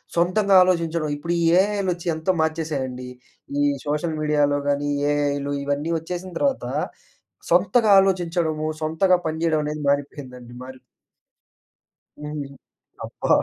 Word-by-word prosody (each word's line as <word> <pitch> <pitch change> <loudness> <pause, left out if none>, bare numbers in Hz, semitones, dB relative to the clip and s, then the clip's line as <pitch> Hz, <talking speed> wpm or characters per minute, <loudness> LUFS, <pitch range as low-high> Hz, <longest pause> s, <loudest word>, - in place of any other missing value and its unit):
సొంతంగా 190 +3 +3
ఆలోచించడం, 170 -3 0
ఇప్పుడు 170 +4 -3
ఈ - - +1 0.2
ఏఐలొచ్చి 190 -4 -2
ఎంతో 160 +4 0
మార్చేసాయండి. 140 -6 -3 0.5
ఈ - - +3 0.2
సోషల్ 150 +2 -1
మీడియాలో 145 -1 +2
గానీ, 145 0 0
ఈ - - -2
ఏఐలు, 145 -1 -1
ఇవన్నీ 145 +3 -2
వచ్చేసిన 180 +3 -6
తర్వాతా, 275 -2 -1 0.8
సొంతగా 200 +6 +3
ఆలోచించడము, 170 -4 0
సొంతగా 160 +4 +2
పనిజేయడం 160 -1 0
అనేది 150 0 -4
మానిపోయిందండి. 130 -4 -4
మారి 130 0 -10 1.4
హ్మ్. 150 -1 -5 0.6
అబ్బా! - - -5
160 Hz, 110 wpm, -23 LUFS, 145-175 Hz, 1.4 s, సొంతంగా